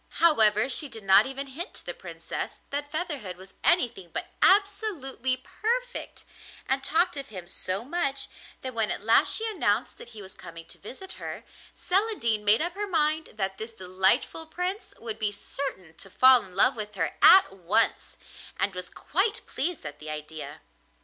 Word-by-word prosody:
However, 220 -9 +4
she 275 +2 0
did 220 -3 -10
not 195 +4 +6
even 270 +1 -5
hint 305 - -8
to - - -10
the - - -4
Princess - - -6
that 290 +1 -3
Featherhead 290 - -4
was 190 +1 -13
anything 240 - +2
but - - -5
absolutely 385 - +2
perfect, 485 - -4 0.4
and 270 +1 0
talked 340 +3 +2
of 275 0 -4
him 185 -7 -7
so 185 +4 -2
much 275 -3 -1 0.4
that 260 -1 -4
when 225 -2 0
at - - -4
last 225 +1 +4
she 450 - +1
announced 430 -4 -1
that 475 - -11
he 215 - -11
was 190 - -12
coming 165 -1 -11
to - - -14
visit 270 - -10
her, - - -6 0.3
Celandine 360 - 0
made 210 +7 +4
up 345 +1 -2
her 410 +2 -4
mind 315 -3 +1
that 195 -2 -3
this 225 +1 -6
delightful 190 - +1
Prince 370 +5 -4
would 220 -1 -6
be 210 -2 +1
certain 200 - -6
to 195 - -10
fall 255 +4 +6
in 185 -1 -13
love 250 +7 +5
with 210 -2 -5
her 165 -4 -2
at 375 - +8
once, 195 +4 +1 0.4
and 200 - 0
was 180 0 -6
quite 415 +7 -1
pleased 320 - -3
at 145 0 -8
the 155 - -8
idea. 155 +1 -7
260 Hz, 175 wpm, -27 LUFS, -, 0.4 s, at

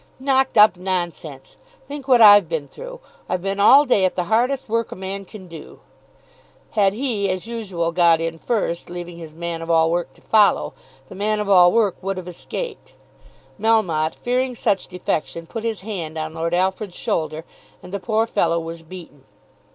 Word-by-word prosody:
"Knocked 265 -2 +1
up, 210 -3 +7
nonsense! 175 -7 -5 0.3
Think 285 -1 -8
what 250 -3 +5
I've 205 -5 +8
been 160 -4 -3
through. - - -10 0.3
I've 185 -1 -2
been 195 0 -2
all 275 +8 +7
day 230 -7 +2
at 185 - +1
the 180 - 0
hardest 245 +7 0
work 230 0 -1
a - - -6
man 195 +1 -6
can 190 -1 -12
do." 165 -3 -12 0.9
Had 200 -3 +2
he 220 -5 -1
as 185 +1 -3
usual 195 -8 -3
got 170 -1 +4
in 165 0 -3
first, 185 -8 -2
leaving 175 -1 -7
his 160 -2 -10
man 170 0 -4
of 165 - -7
all 165 0 +3
work 175 0 -1
to - - -23
follow, 215 -2 +3 0.3
the - - -11
man 210 +2 -1
of 210 - -2
all 180 -3 +6
work 205 -5 +1
would 195 0 -3
have 185 -1 -7
escaped. 475 - -7 0.6
Melmotte, 185 -8 +1
fearing 250 +1 -1
such 205 -4 0
defection, 170 -2 -3
put 225 +6 -6
his 225 -4 -3
hand 175 -7 -5
on 155 0 -4
Lord 165 +1 -2
Alfred's 190 +1 -1
shoulder, 155 0 -2 0.4
and 180 - -11
the 200 - -2
poor 220 +2 0
fellow 170 -7 0
was 165 0 -7
beaten. 160 -5 -12
185 Hz, 180 wpm, -21 LUFS, 170-220 Hz, 0.9 s, I've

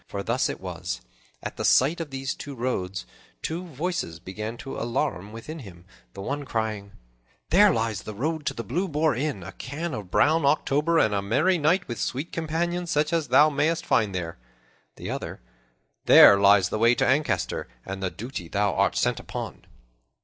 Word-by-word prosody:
For - - -4
thus - - 0
it - - -5
was: - - -5 0.4
at - - -6
the - - -3
sight 155 +7 +4
of 160 - -5
these 135 0 -3
two 140 -1 -8
roads, 100 - -3 0.4
two 170 +3 -3
voices 160 - -3
began 105 +6 -6
to 135 - -7
alarum 115 -5 -2
within 135 +9 -8
him, 90 - -12 0.3
the 95 - -7
one 145 +6 -3
crying, 110 -5 -3 0.6
"There 205 +2 +7
lies 110 - -1
the 110 - -8
road 155 +5 -2
to - - -1
the 115 - -4
Blue 170 - -1
Boar 155 -1 +1
Inn, 130 -7 -2
a - - -8
can 155 +5 -5
of 105 -6 -6
brown 155 - +3
October, 150 +3 +2
and 110 -9 +3
a 100 - +1
merry 145 - +2
night 170 +5 +2
with 120 -4 -5
sweet 135 - -3
companions 170 +2 -2
such 150 0 +1
as 165 -3 +1
thou 145 +5 +6
mayst 160 +4 0
find 105 -5 +2
there;" 85 -6 -4 0.6
the - - -6
other, - - -5 0.7
"There 100 - +9
lies 100 -2 +5
the 110 - -2
way 115 +2 +5
to - - +1
Ancaster 145 +3 0 0.2
and 95 0 -5
the 95 - 0
duty 115 -4 -7
thou 100 +2 0
art - - +2
sent - - +1
upon." - - -7
130 Hz, 185 wpm, -26 LUFS, 100-155 Hz, 0.7 s, There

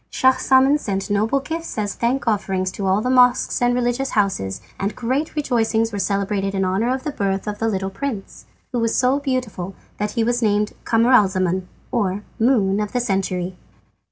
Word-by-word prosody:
Schahzaman 260 +2 +4
sent 195 -4 -3
noble 220 +7 +2
gifts 325 +3 -5
as 205 -2 -1
thank 245 +2 -1
offerings 195 -3 0
to 195 0 -3
all 190 +2 +2
the 250 - -1
mosques 250 -1 +4
and 245 0 +3
religious 245 +2 0
houses, 185 - 0 0.2
and 200 +2 -2
great 260 +7 -2
rejoicings 225 -5 +1
were 200 - -2
celebrated 200 0 -1
in 190 -1 +1
honour 195 +6 +1
of 260 0 -2
the 300 - -2
birth 195 -7 -1
of 210 -1 -4
the 225 - 0
little 195 -3 -2
prince, 220 -2 -5 0.3
who 245 - -1
was 230 -1 +1
so 260 +2 +3
beautiful 250 -9 -3 0.2
that 210 0 -2
he 230 - +1
was 240 +1 0
named 210 -1 +1
Camaralzaman, 190 -6 +3 0.2
or 205 -5 -1 0.2
"Moon 215 -5 +3
of 210 -1 -3
the 250 - +1
Century." 190 -5 -1
220 Hz, 180 wpm, -21 LUFS, 195-250 Hz, 0.3 s, Schahzaman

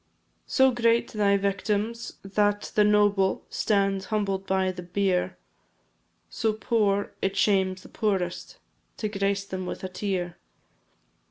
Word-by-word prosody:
So 265 -1 +4
great 235 -1 +2
thy 200 -2 +3
victims, 205 +3 -1
that 205 +1 0
the 210 - +4
noble 205 -2 +3
Stand 195 -2 +1
humbled 195 -3 -1
by 190 -1 +1
the 180 -1 -8
bier; 180 +1 0 0.9
So 220 -2 -1
poor, 210 -2 +1
it 195 0 -1
shames 190 -2 +2
the - - -13
poorest 190 -5 -2 0.4
To 215 - -2
grace 200 -1 -1
them 185 -2 -5
with - - -6
a 185 - -3
tear. 180 -2 -3
200 Hz, 125 wpm, -26 LUFS, 190-210 Hz, 0.9 s, So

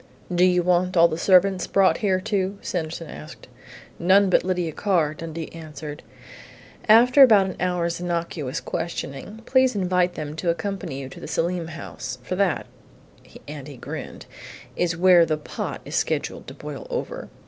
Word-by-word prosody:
"Do 175 +1 +3
you 180 -1 +4
want 180 +1 +1
all 170 0 +7
the 160 - -3
servants 185 +1 +4
brought 195 -1 +3
here, 190 -3 +1
too?" 195 0 -1
Sanderson 165 -1 -4
asked. 75 - -11 0.5
"None 190 +2 +4
but - - +4
Lydia 180 -3 -1
Carr," 165 -4 +1
Dundee 160 0 -6
answered. 155 -2 -8 0.9
"After 245 +5 +7
about 215 -7 +8
an 190 - -5
hour's 175 -2 -1
innocuous 170 -5 -3
questioning, 170 +5 -5
please 260 -2 +3
invite 180 -2 +1
them 150 0 -5
to 175 - -1
accompany 170 -4 -3
you 135 - -6
to - - -11
the - - -8
Selim 170 0 -1
house. 130 -6 -7
For 185 - -3
that 190 -4 +1 0.4
" - - -18
and 145 -2 -8
he 140 -3 -10
grinned, - - -8 0.3
" - - -16
is 175 -1 0
where 180 -1 +6
the 155 -2 0
pot 150 - -6
is - - -6
scheduled - - -2
to - - -9
boil - - -8
over. - - -5
175 Hz, 170 wpm, -24 LUFS, 160-190 Hz, 0.9 s, about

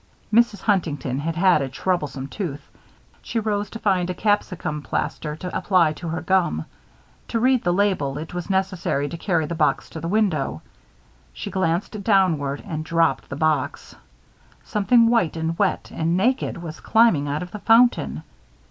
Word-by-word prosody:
Mrs. 225 -3 +3
Huntington 150 - 0
had 160 +2 -3
had 180 -3 +4
a 135 - -2
troublesome 145 -3 -2
tooth. 150 -4 -5 0.5
She - - -5
rose 205 -2 -1
to - - -7
find 185 -5 +1
a 180 - -2
capsicum 185 -7 -1
plaster 150 +1 -3
to 180 +3 -6
apply 180 -4 +3
to 170 +3 -8
her 165 +1 -3
gum. 175 - +1 0.6
To 230 - -1
read 255 +1 +3
the 175 - +2
label, 175 -8 +1
it 160 +3 -7
was 175 +1 -5
necessary 185 -7 0
to - - -6
carry 165 -2 0
the 170 - -4
box 155 -2 0
to 160 - -6
the 165 - -4
window. 170 - 0 0.7
She 60 - -6
glanced 190 +3 -1
downward 165 -10 +2
and 155 -5 -4
dropped 165 +1 +1
the 140 - -5
box. 155 +1 -1 0.7
Something 230 +3 +3
white 230 -9 +2
and 160 +1 -2
wet - - 0
and 165 +2 0
naked 245 +3 +1
was 160 -1 -7
climbing 220 -11 +3
out 145 +4 -2
of 180 - -10
the 210 - -6
fountain. 235 +3 +3
175 Hz, 165 wpm, -23 LUFS, 155-205 Hz, 0.7 s, had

